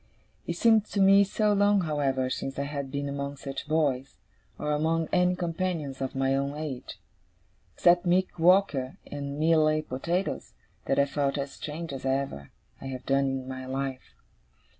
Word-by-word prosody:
It - - -2
seemed 225 -2 +4
to 205 - -4
me 195 +1 +7
so 210 +1 +1
long, 205 0 +4
however, 140 -5 0
since 135 +1 -4
I 140 - 0
had 140 -1 -4
been 140 +1 -3
among 140 0 -4
such 135 +1 -6
boys, 140 -4 0 0.4
or 150 - -2
among 160 +2 +1
any 180 0 +3
companions 165 -5 -3
of 135 0 -3
my 135 0 +1
own 140 +1 -2
age, 150 -5 -6 0.8
except 175 +1 +4
Mick 180 0 +1
Walker 165 -7 +3
and 140 0 -5
Mealy 155 -1 +3
Potatoes, 165 +8 -3 0.3
that 135 - +1
I 140 - +5
felt 140 0 -1
as 140 0 -3
strange 155 +2 -6
as 135 - -6
ever 135 - -2 0.3
I - - -6
have 130 -1 -6
done 135 0 +2
in 135 -1 -2
my 130 0 -6
life. 135 0 -4
145 Hz, 165 wpm, -28 LUFS, 135-175 Hz, 0.8 s, me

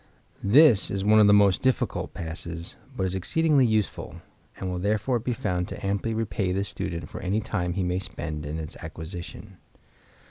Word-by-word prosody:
—This 120 0 +6
is 95 0 -2
one 110 +1 +6
of 105 - +7
the - - +7
most 100 -2 +5
difficult 130 -1 0
passes, 85 0 -6 0.2
but 95 - 0
is 95 - -1
exceedingly 140 - +3
useful, 110 -2 -1 0.4
and 95 - -4
will 90 -1 -2
therefore 105 +6 +1
be 125 +2 -2
found 90 -6 -1
to - - -7
amply 100 +3 -1
repay 105 -3 -1
the 95 +2 0
student 85 -4 -5
for - - -8
any 100 +3 0
time 90 -5 -2
he 95 +1 -1
may 90 +1 0
spend 75 -5 -6
in 75 +2 -4
its 80 +2 -6
acquisition. 85 +4 -7
95 Hz, 180 wpm, -26 LUFS, 90-110 Hz, 0.4 s, of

